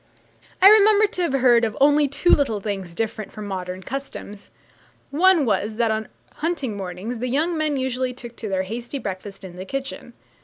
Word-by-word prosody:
I - - +11
remember 425 0 +7
to 400 -3 -3
have 340 -6 0
heard 245 -3 +4
of 220 -2 -1
only 290 +1 +5
two 285 +6 +1
little 250 -8 +3
things 195 -4 -5
different 220 +1 -3
from 215 -1 -8
modern 185 -1 -5
customs. 260 -6 -7 0.6
One 340 0 +4
was, 210 0 0
that 230 -1 +1
on 220 0 -2 0.3
hunting 295 -9 -2
mornings 195 +5 -5
the 250 +1 -2
young 315 +7 +1
men 305 -2 0
usually 260 -1 -1
took 240 -2 -10
their 195 -4 -2
hasty 235 +7 -5
breakfast 195 -3 -6
in 180 -2 -10
the 185 - -5
kitchen. 270 -1 -6
240 Hz, 180 wpm, -23 LUFS, 205-285 Hz, 0.6 s, I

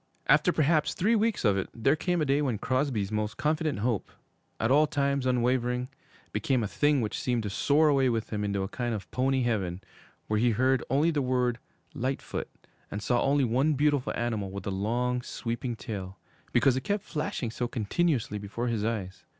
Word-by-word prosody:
After - - +4
perhaps 155 0 +2
three 220 +6 +2
weeks 225 - +1
of 100 -2 +4
it, - - -4
there 135 +6 +3
came 175 0 0
a - - 0
day 140 +1 +2
when 130 -7 0
Crosby's 130 -4 -1
most 105 +1 -2
confident 155 0 0
hope, 115 -3 -1 0.5
at 110 +2 +1
all 150 +2 +5
times 140 -2 0
unwavering, 125 0 +1 0.4
became 130 -4 0
a - - -1
thing 145 +5 +2
which 110 - -2
seemed 120 -3 0
to 105 - -3
soar 150 +9 +3
away 135 -3 +3
with 115 -2 -2
him 105 -1 -1
into 100 -1 -1
a - - -2
kind 120 +2 -2
of 100 - -8
pony 130 0 +1
heaven, 95 -7 -1 0.5
where 105 0 0
he 120 +2 +3
heard 130 +3 +2
only 145 +6 +3
the 150 -3 0
word 125 -2 0 0.3
'Lightfoot,' 130 +2 -3 0.4
and 105 +1 -5
saw 120 +3 +2
only 140 0 +3
one 130 +6 +2
beautiful 145 -1 +1
animal 110 -5 -2
with 100 +1 -7
a 100 - -2
long, 120 +6 0
sweeping 120 0 -4
tail, 100 -4 -6 0.3
because 135 -3 +4
it 130 - -1
kept 200 +6 -1
flashing 150 -6 -3
so 120 +1 -2
continuously 120 - 0
before 110 +4 -3
his 110 -3 -1
eyes. 105 -4 -3
125 Hz, 190 wpm, -28 LUFS, 110-140 Hz, 0.5 s, all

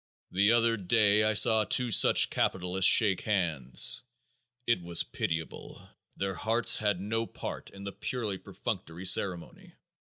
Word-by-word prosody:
The 100 +4 +2
other 115 -1 +1
day 105 +1 +2
I 110 0 +1
saw 110 0 +4
two 125 +3 0
such - - +4
capitalists 90 +1 +1
shake 105 -5 +3
hands. 85 - 0 0.6
It 120 -6 0
was 85 -1 +1
pitiable. 80 0 -6 0.4
Their 95 0 -3
hearts 110 +7 +2
had 105 -4 -1
no 110 +4 -3
part - - -8
in 100 0 -13
the 100 - -6
purely 105 -4 -5
perfunctory 85 +3 -7
ceremony. 90 -1 -1
100 Hz, 140 wpm, -28 LUFS, 90-110 Hz, 0.6 s, saw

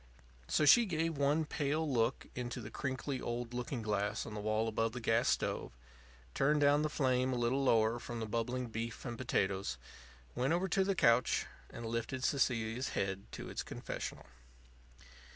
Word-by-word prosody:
So 150 - +2
she 235 +9 +7
gave 165 -2 0
one 145 +3 +2
pale 150 +2 -1
look 120 -2 +1
into 120 0 -4
the 110 -3 -8
crinkly 130 0 -3
old 120 0 -3
looking 125 0 -3
glass 105 -1 -1
on 110 - -7
the 105 - -4
wall 110 +2 0
above 115 +1 0
the 125 - -4
gas 115 0 +2
stove, - - -1 0.6
turned 150 +2 +2
down 145 +1 +5
the 155 - 0
flame 130 -3 +1
a - - 0
little 120 +3 +1
lower 115 -2 +3
from 120 0 -6
the 110 - -2
bubbling 115 +3 -2
beef 115 0 -5
and 120 -2 -3
potatoes, 95 - -1 0.6
went 135 +5 +1
over 180 +3 +1
to 190 +2 +2
the 195 0 0
couch, 125 -6 +3 0.2
and 115 - -7
lifted 115 +3 -3
Cecilia's 125 -3 +1
head 95 0 -1
to - - -6
its - - -3
confessional. - - -6
125 Hz, 170 wpm, -34 LUFS, 115-140 Hz, 0.6 s, she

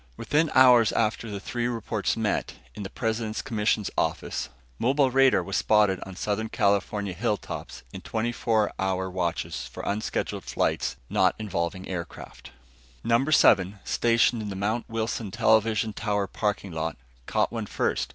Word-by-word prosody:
Within 155 +2 +1
hours 125 -4 +7
after 115 0 0
the 100 -1 -4
three 120 +4 -2
reports 115 -3 -2
met, - - -1 0.2
in - - -8
the 95 - -5
President's 110 -1 -2
commission's 105 -2 0
office, - - -2 0.3
mobile 135 +2 +2
radar 135 0 +4
was 100 - -2
spotted 105 -3 +3
on 95 - -9
Southern 105 +3 -2
California 100 -2 0
hilltops 105 +3 -4
in - - -7
twenty 115 +2 -2
four 110 -3 +1
hour 95 -1 -1
watches 90 -2 -2
for - - -9
unscheduled 105 +2 -2
flights - - -1
not - - +2
involving 95 -3 -3
aircraft. 90 -3 -7 0.5
Number 120 +6 +2
Seven, 95 -8 +5
stationed 115 0 +2
in 105 - -5
the 100 - -5
Mount 105 +5 -2
Wilson 115 -1 -2
television 110 +2 +2
tower 105 -1 -1
parking 100 -1 -2
lot, 80 -1 -3 0.3
caught - - +1
one - - -4
first. - - -1
110 Hz, 150 wpm, -26 LUFS, 100-115 Hz, 0.5 s, hours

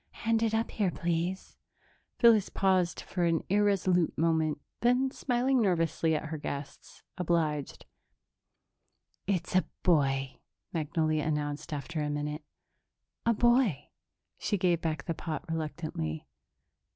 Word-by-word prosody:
Hand 225 0 +3
it 225 -1 +1
up 225 +1 0
here, 205 -4 +1
please." 175 +2 -2 0.6
Phyllis 225 -5 +5
paused 185 -2 +1
for 180 - -3
an 165 -1 +2
irresolute 190 -4 +2
moment, 160 -2 +1 0.2
then, 250 +2 +2
smiling 255 0 +1
nervously 165 -4 +1
at 155 - -3
her 160 -1 -4
guests, 140 -1 -7 0.2
obliged. 160 -5 -1 1.4
"It's 185 -3 -1
a 185 - +5 0.2
boy," 135 -6 +2 0.3
Magnolia 155 -1 0
announced, 150 +1 -2
after 150 +2 -3
a 150 - -1
minute. 150 +1 -3 0.8
"A 230 - +5
boy." 240 - +3 0.5
She 205 - 0
gave 175 -2 +2
back 155 -3 -2
the 170 - -2
pot 155 -2 -5
reluctantly. 155 - -4
165 Hz, 120 wpm, -30 LUFS, 150-195 Hz, 1.4 s, Phyllis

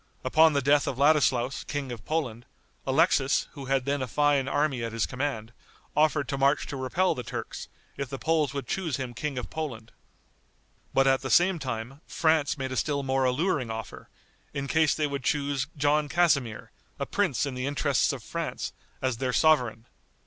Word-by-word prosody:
Upon 155 +4 +5
the 140 -2 +1
death 145 +1 +3
of 130 - -2
Ladislaus, 135 -3 +3
King 145 -3 -4
of 115 -4 -7
Poland, 130 -7 -2 0.4
Alexis, 140 -1 +3
who 140 -2 -9
had 135 -1 0
then 140 0 0
a 130 - -2
fine 145 +1 +2
army 140 -4 0
at 115 -1 -4
his 115 - +1
command, 125 -4 -4 0.4
offered 150 -2 +2
to 140 - -2
march 140 +2 +3
to - - -6
repel 135 +8 +1
the 125 - -5
Turks, - - -6 0.3
if 140 -2 -4
the 135 - -5
Poles 155 -1 +1
would 140 -1 -4
choose 165 +2 -2
him 130 -3 -5
King 140 +3 -4
of 125 - -5
Poland. 120 -8 -5 1.0
But 135 - +3
at 135 0 +3
the 135 - -4
same 175 +2 +4
time 130 +1 -5
France 160 -2 +1
made 130 -1 -3
a - - -3
still 145 -2 0
more 135 0 +1
alluring 130 -1 0
offer, 110 -2 -7 0.5
in 140 -1 -2
case 160 +1 +3
they 155 - 0
would 140 -2 -3
choose 140 -1 0
John 145 +1 +2
Casimir, 140 -10 +1 0.3
a - - -2
prince 185 - 0
in 140 - -4
the 125 +1 -3
interests 145 -1 +1
of 135 -5 -6
France, 165 +8 -4 0.3
as 130 -3 0
their 130 0 -1
sovereign. 125 -7 +2
140 Hz, 185 wpm, -27 LUFS, 125-150 Hz, 1.0 s, Upon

